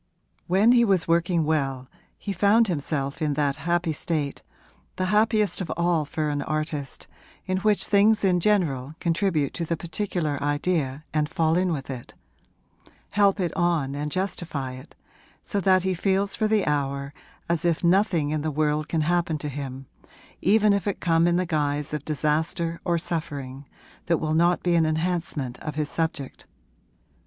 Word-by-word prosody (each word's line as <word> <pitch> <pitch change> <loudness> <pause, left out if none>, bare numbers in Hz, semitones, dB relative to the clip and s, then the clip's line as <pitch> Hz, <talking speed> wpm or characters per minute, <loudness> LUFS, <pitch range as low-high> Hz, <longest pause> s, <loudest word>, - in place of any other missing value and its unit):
When 195 +6 +4
he 240 -1 +5
was 195 -6 +2
working 170 0 +2
well 135 -4 -1 0.3
he 200 - -4
found 205 +5 +4
himself 145 -4 -2
in 150 -2 0
that 145 -2 0
happy 170 -1 +1
state 150 -3 -3 0.5
the 185 - -1
happiest 210 -3 +2
of 175 - -4
all 170 -3 +1
for 150 +1 -2
an 145 -1 -1
artist 155 -2 -4 0.4
in 185 0 -1
which 210 +1 +2
things 210 +1 +4
in 180 -2 +3
general 160 -8 +1
contribute 170 -4 0
to 170 - -3
the 165 0 -2
particular 165 -3 -2
idea 145 -1 -1
and 150 -1 +1
fall 165 -2 +1
in 180 0 +1
with 140 -4 -4
it, 125 -2 -9 1.0
help 200 -1 +3
it 175 -3 -1
on 165 -6 +1
and 150 +1 -3
justify 170 -7 -3
it, 130 +4 -12 0.5
so 205 - -2
that 185 0 +4
he 190 0 +1
feels 195 +2 0
for 215 - +1
the 215 -2 +2
hour 140 -1 -1 0.3
as 170 -1 0
if 170 -1 +1
nothing 170 -4 +2
in 155 -1 -1
the 155 - -1
world 150 0 0
can 160 0 0
happen 170 0 +1
to 150 0 -5
him, 135 -1 -6 0.6
even 210 +2 +4
if 200 0 -1
it 200 - -1
come 165 -1 +3
in 175 - +2
the 180 +1 +1
guise 150 -3 -1
of 150 -2 -3
disaster 160 +3 -1
or 170 -1 +1
suffering, 145 -5 -5 0.4
that 170 -1 +3
will 155 0 -1
not 170 +2 +3
be 175 - +2
an 165 -2 +3
enhancement 155 -5 -2
of 150 - -6
his 150 -1 -1
subject. 160 -5 -3
165 Hz, 170 wpm, -25 LUFS, 145-185 Hz, 1.0 s, he